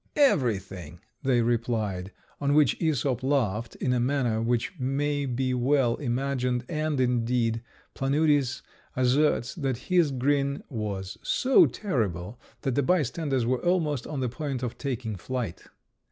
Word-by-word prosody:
"Everything," 95 - +1 0.2
they 125 -3 +2
replied; 110 -5 -1 0.3
on 145 0 +1
which 150 -6 +4
Æsop 140 -6 0
laughed 115 -5 0
in 125 - 0
a 125 - +1
manner 120 -3 +1
which 120 +8 0
may 140 +2 0
be 130 +1 -1
well 125 -1 +2
imagined, 125 -2 -1
and, 155 -3 -1
indeed, 120 -2 +1 0.3
Planudes 140 -1 +1 0.3
asserts 130 0 +2
that 135 -6 -2
his 175 -4 +4
grin 140 +1 0
was 100 -5 -4
so 260 +1 +4
terrible 110 - -2 0.2
that 135 - -1
the 145 - +2
bystanders 140 -4 +1
were 125 +1 0
almost 160 -7 +1
on 145 -4 -4
the 125 - +1
point 135 0 -4
of 120 - -3
taking 120 -6 -4
flight. 115 0 -4
130 Hz, 135 wpm, -27 LUFS, 115-145 Hz, 0.3 s, which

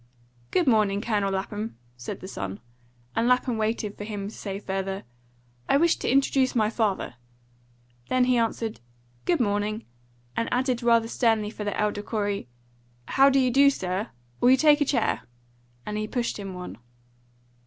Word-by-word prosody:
"Good 355 - +2
morning, 215 -5 +3
Colonel 205 -3 0
Lapham," 205 +3 -3 0.2
said 120 -1 -7
the 185 - -7
son, 95 - -5 0.6
and 230 +1 +2
Lapham 250 -2 +2
waited 215 -1 -1
for - - -4
him 205 -2 -4
to - - -12
say 195 -2 -5
further, 195 -1 -3 0.7
"I - - +5
wish 335 +2 +3
to - - -1
introduce 270 -1 +3
my 215 -2 +2
father." 205 - -1 0.9
Then 255 0 +3
he 250 0 +3
answered, 230 -1 -1 0.5
"Good 345 - +2
morning," 210 0 0 0.5
and 230 - -1
added 250 -1 +1
rather 230 -1 +4
sternly 225 -3 +1
for 215 - -6
the 205 - -2
elder 210 -1 0
Corey, 205 - -2 0.6
"How 275 +1 +6
do 275 - +3
you 255 -1 +3
do, 280 +3 +6
sir? 190 -3 -2 0.3
Will 245 - +5
you 260 - +7
take 300 +1 +5
a - - +4
chair?" 280 - +1 0.6
and 210 0 -3
he 215 - -2
pushed 235 -1 -2
him 195 -2 -6
one. 180 0 -8
220 Hz, 165 wpm, -26 LUFS, 205-250 Hz, 0.9 s, you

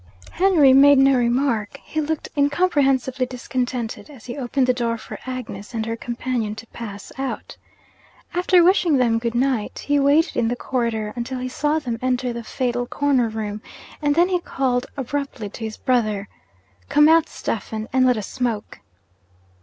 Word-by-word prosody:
Henry 335 -8 +5
made 280 +1 +7
no 270 +1 +5
remark; 240 -3 0
he 315 - -2
looked 310 +1 -3
incomprehensibly 280 -4 +2
discontented 250 0 -4
as 265 -7 -14
he 240 - -6
opened 265 -1 0
the 250 - +3
door 235 -2 -1
for 220 - -9
Agnes 240 -4 -6
and 220 -1 -1
her 230 0 -2
companion 235 -2 -3
to 220 - -9
pass 205 -4 -9
out. 270 -1 -4 0.8
After 360 0 +4
wishing 350 -4 +4
them 235 -3 +2
good 235 0 -3
night, 250 -3 0
he 290 0 +2
waited 290 +4 +3
in 225 - +1
the 240 - 0
corridor 230 -4 -2
until 245 +2 -4
he 255 0 -3
saw 295 +4 0
them 240 -7 -3
enter 250 -1 0
the 235 0 -6
fatal 245 0 -2
corner 270 -5 +1
room 215 -1 -4 0.4
and 290 -1 +2
then 345 +3 +4
he 360 -1 +1
called 255 -6 -1
abruptly 270 -4 -4
to 225 - -6
his 220 -1 -6
brother, 215 -5 0 0.6
'Come 295 0 +6
out, 325 0 +5
Stephen, 220 0 -4
and 260 0 +4
let 250 -2 +4
us 210 - -3
smoke!' 235 - -3
255 Hz, 170 wpm, -22 LUFS, 230-280 Hz, 0.8 s, made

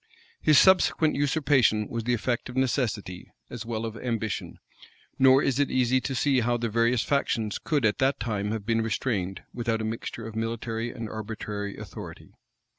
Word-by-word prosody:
His 155 -2 +5
subsequent 185 -4 +5
usurpation 135 -6 +2
was 115 -1 -4
the 120 0 +2
effect 120 +1 -2
of 125 - -8
necessity, 110 -8 -1 0.2
as 115 -1 -7
well 115 -1 -2
as 110 -1 -5
of - - -9
ambition; 115 -4 -3 0.6
nor 130 +1 +6
is 135 0 +1
it 145 - +2
easy 130 0 +2
to 135 - -3
see 135 +1 +2
how 120 0 +1
the 115 -1 -2
various 115 +2 +2
factions 115 -7 0
could 145 -7 0
at 105 - +1
that 135 +1 +2
time 105 -3 -2
have 110 -2 -3
been 115 0 +1
restrained, 100 -5 -2
without 115 -2 -1
a 110 - -2
mixture 115 0 -5
of 110 -1 -8
military 115 +1 -3
and 115 -2 -6
arbitrary 105 -2 -5
authority. - - -9
115 Hz, 180 wpm, -27 LUFS, 110-130 Hz, 0.6 s, nor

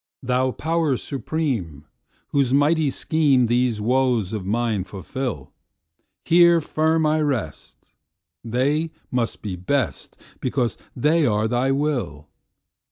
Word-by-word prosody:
Thou 130 +1 +1
Power 160 0 0
Supreme, 120 - -3 0.4
whose 140 -3 +1
mighty 150 +3 +3
schemeThese 125 -6 +2
woes 120 -3 +1
of 100 -4 -4
mine 110 -2 0
fulfil, 100 - -6 0.7
Here 170 0 +6
firm 160 +1 +1
I 155 +1 +2
rest; 130 - -4 0.6
they 140 +8 0 0.2
must 120 -3 -2
be 100 -4 -4
best, 115 +7 -2 0.2
Because 125 -2 -1 0.2
they 150 +4 +2
are 105 0 +1
Thy 120 +3 0
will! 135 - -1
130 Hz, 105 wpm, -22 LUFS, 110-150 Hz, 0.7 s, Here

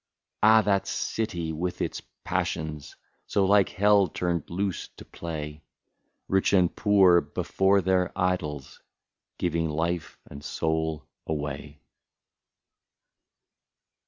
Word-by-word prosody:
Ah, 110 0 +6
that 100 -2 +1
city! 90 -8 -2
with 90 +3 -3
its - - -3 0.2
passions, 75 -2 -3 0.3
So 100 - +2
like 100 0 +4
hell 100 -1 +4
turned 85 -1 -2
loose 95 +2 -2
to - - -11
play. 75 -3 -6 0.7
Rich 95 +1 +2
and 90 -3 +3
poor, 95 -5 +5
before 95 +1 +1
their 90 0 +1
idols. 85 -7 -2 0.6
Giving 85 -2 0
life 80 +2 -2
and 70 +1 -10
soul 80 -3 -2 0.2
away. 75 -1 -5
85 Hz, 100 wpm, -27 LUFS, 80-95 Hz, 0.7 s, Ah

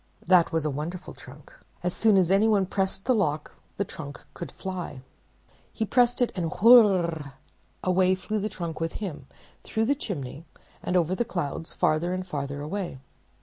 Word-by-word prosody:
That 175 -2 +5
was 160 -2 0
a 150 - 0
wonderful 160 +6 -5
trunk. - - -14 0.3
So 180 - +1
soon 210 +3 +3
as 185 -1 +3
any 200 +3 +5
one 205 -3 +3
pressed 195 0 -2
the 255 - +4
lock 155 -9 0 0.3
the 200 - 0
trunk 145 -5 -8
could 170 - -7
fly. 180 -8 -6 0.7
He 220 - -2
pressed 245 +2 +3
it, 245 - 0
and 170 -4 -2
whirr! 185 - +5 0.5
away 185 0 +3
flew 215 +3 -3
the 210 +2 -2
trunk 170 -5 -5
with 165 0 -2
him 170 -10 -6 0.4
through 220 0 -1
the 275 - +3
chimney 155 - -5 0.4
and 180 - 0
over 175 +1 +2
the 215 - +1
clouds 165 -6 -4
farther 170 +4 +1
and 185 0 -4
farther 145 -4 -4
away. 170 0 -4
180 Hz, 175 wpm, -26 LUFS, 160-200 Hz, 0.7 s, That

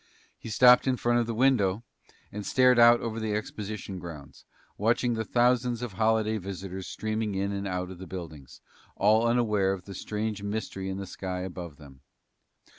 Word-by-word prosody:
He - - -8
stopped 125 +4 +6
in 130 -1 +2
front 120 0 +2
of 115 - -1
the 115 - -3
window 115 -5 +2 0.5
and 105 0 -6
stared 125 +2 +4
out 120 0 +7
over 115 -1 -3
the 110 -1 -2
exposition 105 -2 -5
grounds, 80 -5 -10 0.3
watching 120 +3 +1
the 110 -1 -2
thousands 125 +1 +1
of 120 -5 -5
holiday 110 +1 +1
visitors 95 0 -6
streaming 110 -1 -3
in 100 +1 -1
and 100 0 -3
out 90 0 -3
of 90 - -10
the 95 - -8
buildings, 80 -8 -9 0.3
all 110 +3 +3
unaware 105 -5 +2
of 95 -2 -8
the 100 - -8
strange 105 +2 -4
mystery 100 -2 -4
in 95 - -4
the 100 - -5
sky 90 -1 -5
above 90 -4 -7
them. 70 -3 -15
105 Hz, 180 wpm, -28 LUFS, 95-115 Hz, 0.5 s, out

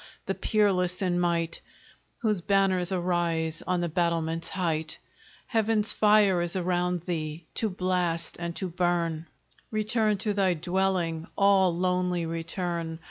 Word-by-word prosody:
the - - -1
peerless 185 -4 +1
in 175 -1 +1
might, 170 -1 0 0.6
Whose 210 -5 +1
banners 195 -1 +2
arise 170 -3 0
on 180 -1 +1
the 175 - 0
battlements' 165 0 -1
height, 160 -4 -2 0.5
Heaven's 220 -1 +1
fire 210 -4 +4
is 175 +1 -2
around 180 -1 0
thee, 160 -2 -4
to 220 - 0
blast 180 -3 -1
and 170 -1 -4
to 190 - -3
burn; 170 -2 -1 0.4
Return 215 -1 +1
to 210 +1 -1
thy 190 -3 +2
dwelling! 175 -1 -1
all 195 -2 +5
lonely 180 -1 0
return! 165 0 -3
180 Hz, 130 wpm, -27 LUFS, 170-190 Hz, 0.6 s, all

